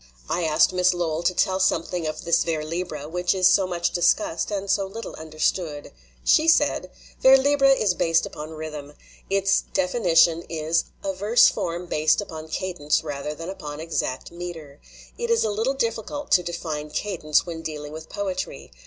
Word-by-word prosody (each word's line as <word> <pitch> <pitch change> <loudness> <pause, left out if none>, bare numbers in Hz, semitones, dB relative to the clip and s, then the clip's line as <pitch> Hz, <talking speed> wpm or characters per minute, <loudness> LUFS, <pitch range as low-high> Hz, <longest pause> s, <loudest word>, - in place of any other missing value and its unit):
I 175 - -1
asked 155 +3 +3
Miss 180 0 +3
Lowell 165 -2 -1
to 175 +1 +1
tell 190 +1 +1
something 175 -2 0
of 155 - -5
this 170 - +3
vers 155 -2 -2
libre 155 -3 -4
which 180 +3 0
is 185 -1 +5
so 190 0 +4
much 175 -1 -1
discussed 170 -1 +1
and 200 -1 -3
so 195 0 +1
little 225 +4 -7
understood. 155 -1 -2 0.3
She 315 - +4
said: 325 - +3 0.3
"Vers 265 +1 +8
libre 275 0 +3
is 215 -8 +3
based 165 -1 +2
upon 155 +1 -8
rhythm. 155 -2 -7 0.4
Its 195 0 +2
defini 180 -2 +1
tion 165 0 +6
is 165 0 0 0.2
'A 195 - -2
verse 205 +6 +5
form 170 +1 -3
based 155 -2 +2
upon 160 -6 -6
cadence 160 -3 -1
rather 150 0 -4
than 165 +3 -7
upon 150 -6 -7
exact 160 -5 -3
meter/ 170 -5 -8 0.4
It 475 0 -2
is 465 - +3
a 215 - 0
little 225 +6 0
difficult 235 +3 -3
to 180 - +6
define 165 -3 -5
cadence 155 -2 0
when 165 -2 -6
dealing 150 -2 -6
with 160 0 -9
poetry. 200 - -4
170 Hz, 175 wpm, -24 LUFS, 155-195 Hz, 0.4 s, Vers